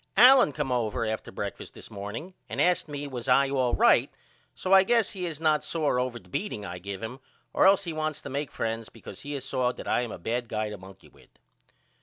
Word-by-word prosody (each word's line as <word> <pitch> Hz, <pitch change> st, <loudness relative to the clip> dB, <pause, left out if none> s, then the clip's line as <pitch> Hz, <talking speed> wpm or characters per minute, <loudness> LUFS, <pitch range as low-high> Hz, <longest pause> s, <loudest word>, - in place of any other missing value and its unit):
Allen 250 Hz, -, +8 dB
come 135 Hz, -1 st, -3 dB
over 115 Hz, -1 st, 0 dB
after 110 Hz, 0 st, -4 dB
breakfast -, -, -6 dB
this -, -, -11 dB
morning 105 Hz, -, -6 dB, 0.2 s
and -, -, -4 dB
asked 180 Hz, -2 st, +2 dB
me 145 Hz, -1 st, -5 dB
was 125 Hz, -4 st, -6 dB
I 135 Hz, +1 st, +4 dB
all 130 Hz, -3 st, +1 dB
right -, -, +5 dB, 0.5 s
so 185 Hz, -, 0 dB
I 190 Hz, -, +9 dB
guess 230 Hz, +2 st, +2 dB
he 180 Hz, -3 st, -4 dB
is 155 Hz, -3 st, -5 dB
not 155 Hz, -2 st, +2 dB
sore 150 Hz, -6 st, 0 dB
over 125 Hz, -1 st, -2 dB
the 95 Hz, -, -15 dB
beating 105 Hz, -, -4 dB
I 90 Hz, -1 st, -6 dB
give 100 Hz, +2 st, -6 dB
him 125 Hz, +4 st, -6 dB, 0.3 s
or -, -, +5 dB
else 195 Hz, 0 st, +5 dB
he 170 Hz, -3 st, -4 dB
wants 155 Hz, -1 st, -2 dB
to -, -, -7 dB
make 140 Hz, 0 st, -2 dB
friends 115 Hz, 0 st, -3 dB
because -, -, -11 dB
he 145 Hz, +1 st, -6 dB
has 135 Hz, -2 st, -4 dB
saw 125 Hz, -2 st, 0 dB
that -, -, -9 dB
I -, -, +2 dB
am 120 Hz, -3 st, -4 dB
a -, -, -6 dB
bad 120 Hz, +5 st, -2 dB
guy 110 Hz, -1 st, -2 dB
to 105 Hz, -, -6 dB
monkey 95 Hz, +1 st, -14 dB
with. -, -, -22 dB
130 Hz, 235 wpm, -27 LUFS, 115-155 Hz, 0.5 s, I